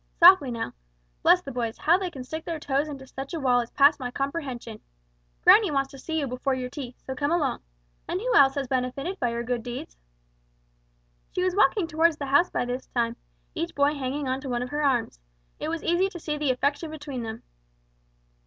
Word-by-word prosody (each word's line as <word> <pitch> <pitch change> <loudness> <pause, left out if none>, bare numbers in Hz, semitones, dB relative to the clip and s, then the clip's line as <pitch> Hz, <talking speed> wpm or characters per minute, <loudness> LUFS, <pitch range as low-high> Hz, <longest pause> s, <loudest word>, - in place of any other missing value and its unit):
Softly 350 -5 +7
now. 230 - -4 0.5
Bless 360 0 +5
the 275 - -6
boys, 235 -3 -3
how 340 +4 +3
they 375 -2 -2
can 270 -7 -8
stick 315 +5 -6
their 330 -1 -4
toes 285 0 0
into 275 -3 -8
such 270 +4 -7
a - - -2
wall 250 -3 +3
is 235 -1 -3
past 285 +2 +5
my 250 -2 -3
comprehension! 265 -5 -4 0.6
Granny 425 -3 +7
wants 275 -2 0
to 275 - -11
see 320 +3 -3
you 290 - -1
before 260 +1 -1
your 250 -1 -4
tea, 255 -4 -7
so 265 - -7
come 285 +3 -1
along. 340 - 0 0.5
And 360 - -2
who - - -1
else 270 -1 +6
has 275 -2 -2
been 255 0 +1
benefited 275 +9 -4
by 245 - +1
your 235 0 -3
good 245 0 -2
deeds?" 240 - -7 1.4
They 365 - +1
were 370 - +2
walking 405 -2 +3
toward 325 0 +2
the 285 - -4
house 285 +6 +4
by - - -1
this 250 +1 -4
time, 235 -1 -1 0.4
each 335 +1 -4
boy 285 +1 +3
hanging 280 0 -3
on 260 +1 -1
to 270 - -6
one 245 0 -1
of 250 - -6
her 295 +2 -2
arms. 245 - +1 0.4
It 305 - -3
was 330 0 -3
easy 350 +3 +2
to 350 - -9
see 305 -1 -3
the 295 -2 -1
affection 285 +5 0
between 290 -4 -6
them. 225 0 -6
275 Hz, 220 wpm, -26 LUFS, 250-320 Hz, 1.4 s, Softly